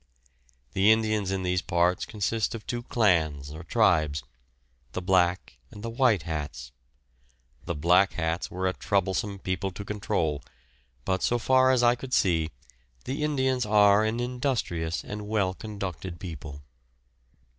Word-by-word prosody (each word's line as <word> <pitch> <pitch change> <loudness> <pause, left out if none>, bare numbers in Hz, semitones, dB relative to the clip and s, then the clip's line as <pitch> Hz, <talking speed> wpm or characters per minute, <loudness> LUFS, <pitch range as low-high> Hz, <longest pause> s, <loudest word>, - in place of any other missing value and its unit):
The 100 +3 +5
Indians 110 -3 +1
in 95 -1 -2
these 90 0 0
parts 85 +1 +1
consist 110 +1 -1
of 110 - -8
two 120 -1 -3
clans 80 - +1
or 80 +1 -8
tribes, 80 - +2 0.7
the 95 - -3
"Black" 90 -6 +1
and 105 - -11
the 115 - -4
"White 115 - +2
Hats"; 75 -4 -5 0.9
the - - -3
"Black 90 +6 +4
Hats" 80 0 -2
were 95 +1 -3
a 95 - +1
troublesome 100 +1 -1
people 95 0 -2
to 95 +2 -8
control, 80 -8 -1 0.6
but 95 0 0
so 120 - +2
far 130 +2 +4
as 130 -2 +3
I 120 0 +6
could 125 +1 -3
see, 80 -4 +2 0.6
the 135 +4 -3
Indians 130 -4 +1
are 105 -1 +5
an 110 +2 -1
industrious 120 - -2
and 105 0 -6
well 100 -4 +1
conducted 95 -5 -6
people. 75 -5 -8
95 Hz, 145 wpm, -27 LUFS, 85-110 Hz, 0.9 s, I